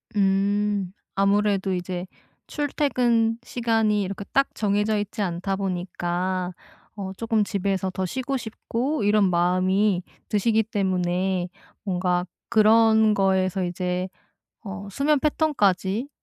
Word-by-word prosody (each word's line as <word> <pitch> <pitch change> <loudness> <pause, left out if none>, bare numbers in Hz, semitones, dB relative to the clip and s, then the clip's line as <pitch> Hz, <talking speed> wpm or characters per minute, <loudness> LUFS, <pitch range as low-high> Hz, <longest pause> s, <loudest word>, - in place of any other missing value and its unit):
음, 200 0 +1 0.2
아무래도 200 -1 +2
이제 180 0 -3 0.4
출퇴근 245 -6 +1
시간이 225 -4 +1
이렇게 200 +2 -5
딱 275 0 +2
정해져 210 +1 +1
있지 210 +1 -4
않다 185 +1 -1
보니까 180 -1 -2 0.4
어 195 -2 -5
쪼끔 225 -2 +1
집에서 195 -2 -1
더 185 0 -3
쉬고 260 +6 -2
싶고 235 +3 -3
이런 205 -2 +4
마음이 185 +2 +2 0.3
드시기 220 +1 +2
때문에 185 -3 -1 0.3
뭔가 180 -2 0 0.2
그런 220 -1 +5
거에서 190 -1 +1
이제 180 +1 -2 0.6
어 200 -1 -7
수면 285 +6 +2
패턴까지 245 - +1
200 Hz, 240 characters per minute, -24 LUFS, 185-220 Hz, 0.6 s, 그런